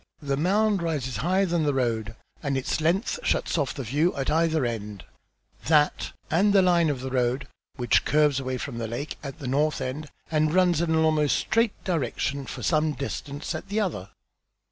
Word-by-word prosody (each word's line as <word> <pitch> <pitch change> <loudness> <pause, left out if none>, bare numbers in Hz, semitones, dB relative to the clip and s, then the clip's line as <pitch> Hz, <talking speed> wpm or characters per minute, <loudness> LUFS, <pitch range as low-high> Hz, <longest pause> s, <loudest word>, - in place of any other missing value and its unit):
The 140 -1 0
mound 200 +6 +2
rises 140 -8 -2
higher 185 - +2
than 170 -2 0
the 145 -2 +1
road, 115 -3 -1 0.3
and 140 -3 -1
its 130 +4 -1
length 175 +8 +1
shuts - - 0
off 145 -5 -1
the 135 - -4
view 145 +9 +1
at 135 -1 -1
either 160 -3 +2
end, 105 -4 -5 0.6
that 150 -2 +2 0.2
and 200 +5 +3
the 195 -2 +6
line 170 -3 +4
of 135 -4 -2
the 130 0 -5
road, 125 0 0 0.3
which 120 -3 +2
curves 150 -2 +3
away 130 -1 -3
from 125 -2 -5
the 115 - -3
lake 120 +7 -5
at 135 -2 -7
the 140 - -6
north 150 +4 +1
end, 145 +4 -4 0.2
and 155 +1 +2
runs 180 -3 +4
in 170 - 0
an 160 - +2
almost 150 -2 +2
straight 225 +2 0
direction 140 -4 -2
for - - -7
some 155 -1 +2
distance 140 +3 -5
at 155 +4 -6
the 210 +2 0
other." 150 - -2
150 Hz, 190 wpm, -26 LUFS, 130-170 Hz, 0.6 s, the